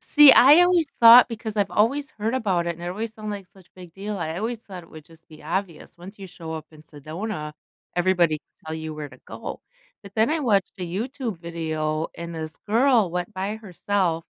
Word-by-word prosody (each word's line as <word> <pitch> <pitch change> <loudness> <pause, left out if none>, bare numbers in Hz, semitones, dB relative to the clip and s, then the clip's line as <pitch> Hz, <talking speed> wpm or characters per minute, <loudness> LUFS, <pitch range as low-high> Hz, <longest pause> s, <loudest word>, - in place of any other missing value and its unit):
see, 295 -2 +8
I 290 +7 +8
always 355 -3 +3
thought 235 +1 +9
because 220 -2 -6
I've 200 -1 +1
always 275 +7 +1
heard 220 +3 -3
about 190 -9 0
it 170 -1 -2
and 170 - -12
it 175 - -4
always 220 +5 -4
sound 215 -1 -7
like 200 -2 -6
such 190 -1 -21
big 180 -3 -13
deal, 200 +1 -5
I 160 0 -4
always 230 +3 -3
thought 185 -6 -10
it - - -21
would 155 -1 -12
just 165 +1 -21
be 155 - -15
obvious. 180 -3 -5
Once 195 +4 -12
you 195 - -8
show 165 -2 -8
up 155 -1 -7
in 155 -1 -16
Sedona, 155 +2 -6 0.4
everybody 175 -3 +2
will 155 - -13
tell 160 - -4
you 160 -1 -6
where 150 -1 -6
to - - -17
go, - - -7 0.4
but 200 -1 -13
then 220 +5 +2
I 320 - +1
watched 210 -9 +1
a 180 - -4
YouTube 225 +3 -4
video, 160 -2 -3
and 170 0 -7
this 160 0 -6
girl 230 -4 +3
went 180 +3 -4
by 195 +3 -3
herself, 185 -4 -2
185 Hz, 215 wpm, -24 LUFS, 165-220 Hz, 0.4 s, thought